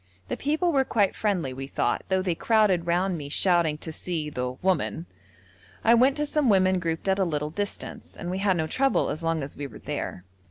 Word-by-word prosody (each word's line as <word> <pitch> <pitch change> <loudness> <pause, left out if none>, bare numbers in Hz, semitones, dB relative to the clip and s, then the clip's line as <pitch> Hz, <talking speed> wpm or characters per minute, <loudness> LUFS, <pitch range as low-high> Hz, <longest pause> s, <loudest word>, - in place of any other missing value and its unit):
The - - -1
people 315 +5 0
were 275 -3 +3
quite 205 -6 +1
friendly, 185 -11 -1
we 135 +1 -6
thought, - - -1
though 190 -1 +2
they 180 -2 +1
crowded 195 -3 +2
round 175 0 +1
me 140 -1 -7
shouting 170 -1 +2
to 160 - -7
see 155 -2 -4
the 125 -2 -3
'woman.' 180 -2 0 0.8
I 230 - +6
went 260 +4 +4
to 295 - 0
some 295 -3 +1
women 185 -2 +4
grouped 165 +1 -3
at 190 0 +2
a - - +4
little 150 -3 -2
distance, 205 +4 -5
and 175 - -4
we 185 - -2
had 195 -2 +2
no 160 - 0
trouble 270 - +1
as 155 - -4
long 165 -2 0
as 140 - -8
we 145 0 -5
were - - -12
there. 90 - -5
180 Hz, 215 wpm, -26 LUFS, 160-205 Hz, 0.8 s, I